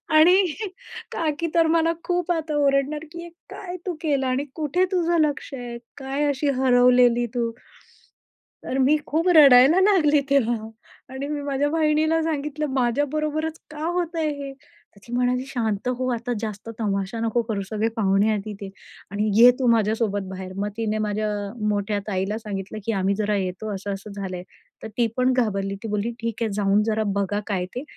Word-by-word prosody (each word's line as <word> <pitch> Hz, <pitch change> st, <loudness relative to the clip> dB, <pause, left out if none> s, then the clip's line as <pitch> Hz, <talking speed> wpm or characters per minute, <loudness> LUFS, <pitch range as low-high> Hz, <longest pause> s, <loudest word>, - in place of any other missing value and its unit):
आणि 320 Hz, +4 st, +7 dB, 0.8 s
का 320 Hz, -2 st, 0 dB
की 335 Hz, -, 0 dB
तर 330 Hz, -1 st, +4 dB
मला 330 Hz, 0 st, +3 dB
खूप 355 Hz, -1 st, -1 dB
आता 320 Hz, -3 st, -2 dB
ओरडणार, 280 Hz, +2 st, +1 dB
की 340 Hz, 0 st, -8 dB, 0.2 s
काय 360 Hz, -2 st, -7 dB
तू 365 Hz, -, -1 dB
केलं 280 Hz, -4 st, 0 dB
आणि 255 Hz, +2 st, 0 dB
कुठे 315 Hz, +3 st, +1 dB
तुझं 345 Hz, -2 st, +2 dB
लक्ष 285 Hz, -, -6 dB
आहे? 245 Hz, -2 st, -6 dB, 0.2 s
काय 275 Hz, +2 st, -2 dB
अशी 285 Hz, +1 st, 0 dB
हरवलेली 245 Hz, -1 st, +4 dB
तू? 235 Hz, -1 st, 0 dB, 1.2 s
तर 260 Hz, -, -2 dB
मी 270 Hz, +3 st, +4 dB
खूप 325 Hz, +4 st, 0 dB
रडायला 280 Hz, +2 st, +8 dB
लागली 315 Hz, -8 st, +4 dB
तेव्हा 235 Hz, -5 st, +1 dB, 0.5 s
आणि 270 Hz, +2 st, -4 dB
मी 295 Hz, 0 st, -3 dB
माझ्या 285 Hz, 0 st, 0 dB
बहिणीला 315 Hz, +1 st, +2 dB
सांगितलं. 300 Hz, -1 st, -2 dB
माझ्याबरोबरच 300 Hz, +5 st, -1 dB
का 305 Hz, +1 st, -5 dB
होतंय 335 Hz, -2 st, -1 dB
हे? 275 Hz, -1 st, -6 dB, 0.4 s
तर -, -, -17 dB
ती 240 Hz, -, -8 dB
म्हणाली, 250 Hz, +1 st, +1 dB
"शांत 225 Hz, -5 st, -2 dB
हो, 255 Hz, +1 st, -2 dB
आता 240 Hz, +1 st, -3 dB
जास्त 215 Hz, 0 st, -6 dB
तमाशा 200 Hz, 0 st, -2 dB
नको 230 Hz, +1 st, +1 dB
करू, 210 Hz, -4 st, -2 dB
सगळे 215 Hz, 0 st, 0 dB
पाहुणे 200 Hz, -1 st, +2 dB
आहेत 215 Hz, -2 st, 0 dB
तिथे 205 Hz, -2 st, -7 dB, 0.4 s
आणि 210 Hz, +2 st, 0 dB
ये 245 Hz, +1 st, +10 dB
तू 255 Hz, -, +1 dB
माझ्यासोबत 215 Hz, -3 st, +1 dB
बाहेर." 190 Hz, 0 st, -7 dB
मग 205 Hz, +1 st, -1 dB
तिने 215 Hz, -1 st, -1 dB
माझ्या 210 Hz, +1 st, -1 dB, 0.4 s
मोठ्या 205 Hz, 0 st, -1 dB
ताईला 195 Hz, +1 st, -1 dB
सांगितलं, 205 Hz, -1 st, -6 dB
की 230 Hz, -, 0 dB
"आम्ही 195 Hz, +1 st, +1 dB
जरा 210 Hz, 0 st, 0 dB
येतो, 190 Hz, +3 st, -3 dB
असं, 200 Hz, +1 st, -4 dB
असं 195 Hz, +2 st, -8 dB
झालंय." 190 Hz, -3 st, -5 dB, 0.4 s
तर -, -, -4 dB
ती 235 Hz, -1 st, +3 dB
पण 255 Hz, +1 st, +3 dB
घाबरली. 200 Hz, -5 st, 0 dB
ती -, -, -4 dB
बोलली, 210 Hz, +2 st, -1 dB
"ठीक 230 Hz, 0 st, -3 dB
आहे, 220 Hz, -, -1 dB
जाऊन 205 Hz, 0 st, +2 dB
जरा 220 Hz, 0 st, 0 dB, 0.2 s
बघा 200 Hz, +1 st, -1 dB
काय 190 Hz, -4 st, -1 dB
ते, 250 Hz, -, -3 dB
245 Hz, 175 wpm, -23 LUFS, 210-300 Hz, 1.2 s, ये